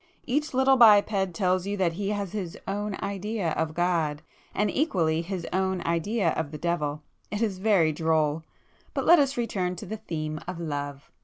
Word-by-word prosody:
Each 295 +4 0
little 265 +1 +4
biped 205 -5 +5
tells 185 -1 +1
you 205 0 -2
that 180 -3 +1
he 200 +3 -3
has 200 -3 -2
his 185 -6 -5
'own 205 0 -2
idea' 200 -2 -2
of 155 0 -2
God, 165 -4 0 0.3
and 210 0 0
equally 165 - +1
'his 175 0 -5
own' 190 -1 0
idea 170 +3 +1
of 160 -2 -2
the 150 - -7
Devil. 150 -2 -2 0.3
It 210 +2 -1
is 195 -4 -1
very 190 -6 +3
droll! 160 0 +1 0.5
But - - -1
let 345 -1 +7
us 275 -2 +1
return 185 -6 -1
to - - -8
the 220 - -5
theme 155 -5 -4
of 180 -1 -5
love. 145 -3 -5
185 Hz, 180 wpm, -27 LUFS, 160-205 Hz, 0.5 s, let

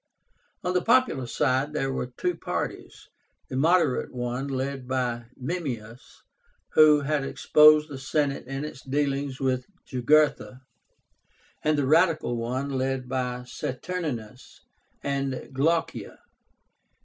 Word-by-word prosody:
On 180 0 -1
the 180 - +2
popular 235 - +2
side 130 +5 0
there 135 -3 -1
were 125 - -2
two 355 - -2
parties, - - -5 0.4
the 130 - -5
moderate 165 0 +2
one, 125 +2 -3
led 135 -1 -3
by 125 -2 -1
MEMMIUS, 125 -6 -6 0.5
who 150 -1 +6
had 145 0 0
exposed 150 +2 +5
the 140 -3 -8
Senate 140 -1 -1
in 135 +2 -4
its 145 -3 -8
dealings 140 0 -1
with 130 -2 -1 0.2
Jugurtha, 130 0 +2 1.0
and 155 0 +2
the 145 - +1
radical 155 -3 +3
one, 125 +4 -2
led 130 -1 -1
by 125 -1 -2
Saturnínus 125 -3 -5 0.4
and 135 -2 -2
Glaucia. 160 +5 0
135 Hz, 115 wpm, -26 LUFS, 130-150 Hz, 1.0 s, who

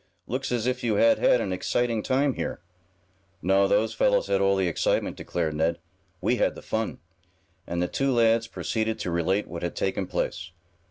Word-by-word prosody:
"Looks 130 +2 -3
as 120 -2 0
if 125 0 -1
you 115 - +1
had 285 0 +4
had - - +4
an - - -2
exciting 120 -3 0
time 135 +4 +1
here." - - -4 0.8
"No, 95 +1 +4
those 110 +3 +2
fellows 115 - +2
had 100 0 +2
all 100 0 +3
the 95 -2 +1
excitement," 85 - 0
declared 80 -3 -2
Ned. 80 +2 0 0.4
"We - - +1
had - - +1
the - - -11
fun." 110 0 -2 0.7
And 85 +1 -1
the - - 0
two 135 +8 0
lads 115 -1 +3
proceeded 110 -1 -2
to 90 - -3
relate 90 +4 +1
what 85 -1 -6
had 85 - -3
taken 95 -1 -1
place. 90 -1 -3
110 Hz, 185 wpm, -26 LUFS, 90-120 Hz, 0.8 s, had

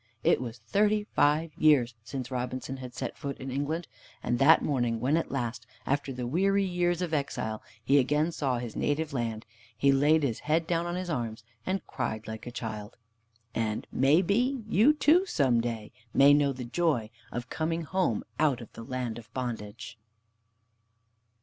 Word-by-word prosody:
It - - +4
was 120 -1 -5
thirty 210 - +1
five 155 -4 +2
years 135 -6 +4
since 130 +2 -6
Robinson 130 +1 -3
had 125 -1 -9
set 130 -1 -4
foot 140 -1 -4
in 135 0 -6
England. 145 +5 -2 0.4
And 120 - 0
that 155 +4 +6
morning, 120 -5 0
when 130 +6 +2
at 165 - 0
last, 120 -3 -3 0.2
after 140 0 0
the 125 -1 -4
weary 195 +9 +2
years 175 -1 0
of 170 -3 -3
exile, 110 -7 -2 0.2
he 140 +1 +5
again 150 +5 +2
saw 135 -6 -1
his 120 -2 -5
native 150 0 -1
land, 115 -4 -2 0.3
he 140 +4 +4
laid 145 +3 +4
his 120 -6 0
head 160 +2 +1
down 170 0 0
on 175 - -2
his 180 -1 -3
arms 115 -6 -3 0.2
and 190 +1 -1
cried 110 0 -4
like 110 +2 -7
a - - -5
child. 110 -3 -6 0.6
And, 110 -2 -1
may 145 +7 +4
be, 245 +7 +1
you 220 +7 +5
too 315 +5 +4
some 130 - +2
day 115 -2 -4 0.2
may 140 +1 +7
know 145 -1 +4
the 130 -1 -6
joy 120 -5 0 0.2
of 120 +1 -5
coming 165 +1 -1
home, 175 - 0 0.2
out 150 -5 +3
of 115 - -11
the - - -9
land 120 -2 -3
of 115 0 -15
bondage. 115 -3 -5
135 Hz, 175 wpm, -29 LUFS, 120-165 Hz, 0.6 s, may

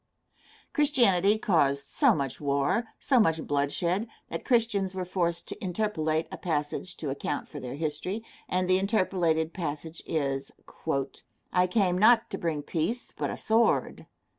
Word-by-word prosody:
Christianity 225 - +4
caused 140 -9 +2
so - - +3
much 135 -2 -3
war, 145 +10 +1
so 260 -3 +3
much 160 -7 +2
bloodshed, 170 +9 0 0.2
that - - -4
Christians 210 -6 +1
were 185 -1 -2
forced 170 -2 -1
to 215 - -7
interpolate 165 -5 0
a - - -7
passage 160 +2 -2
to 145 -4 -3
account 145 +1 -3
for 145 - -8
their 125 0 -6
history, 160 +8 -3 0.3
and 185 0 +1
the 185 0 +4
interpolated 180 -5 +1
passage 160 -1 -5
is, 140 -3 -1 1.0
"I 180 0 +4
came 180 -2 +2
not 230 +3 +5
to - - -3
bring 155 -3 -2
peace, 180 +11 -2
but - - -2
a - - -4
sword." 225 +1 +1
175 Hz, 145 wpm, -28 LUFS, 150-200 Hz, 1.0 s, not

